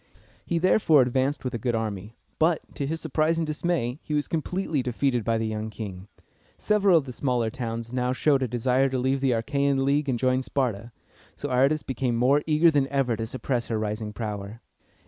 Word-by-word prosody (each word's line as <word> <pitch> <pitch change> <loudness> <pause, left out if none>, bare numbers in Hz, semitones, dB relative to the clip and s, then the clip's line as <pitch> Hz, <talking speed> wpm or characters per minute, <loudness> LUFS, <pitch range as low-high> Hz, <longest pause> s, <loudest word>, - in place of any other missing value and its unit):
He 170 - 0
therefore 165 -5 +4
advanced 130 +4 0
with 125 -1 -3
a 120 - -3
good 120 +1 -1
army; 110 -1 -4 0.2
but, 160 0 +2
to 140 - -3
his 160 +2 -2
surprise 160 +1 0
and 165 - 0
dismay, 155 -4 -1
he 150 - -3
was 145 - 0
completely 165 -2 -1
defeated 125 -1 0
by 115 +1 +1
the 110 - -1
young 110 0 -3
king. 100 -3 -7 0.5
Several 200 -4 +3
of 150 - 0
the 130 - -6
smaller 125 -3 -1
towns 115 -1 -5
now 125 0 0
showed 135 +1 +2
a 130 - +1
desire 125 +3 +1
to 130 - -2
leave 130 +2 0
the 135 - +2
Achæan 140 +3 +1
League 140 +1 +1
and 125 - +1
join 130 +1 +1
Sparta, 120 -4 -2 0.4
so 145 - -5
Aratus 135 +5 +2
became 125 -2 -1
more 130 +5 +3
eager 160 +2 +5
than 140 -3 +2
ever 135 -4 0
to 115 +1 -4
suppress 125 -1 -2
her 115 - -1
rising 105 0 -3
power. 105 0 -5
130 Hz, 200 wpm, -26 LUFS, 115-145 Hz, 0.5 s, eager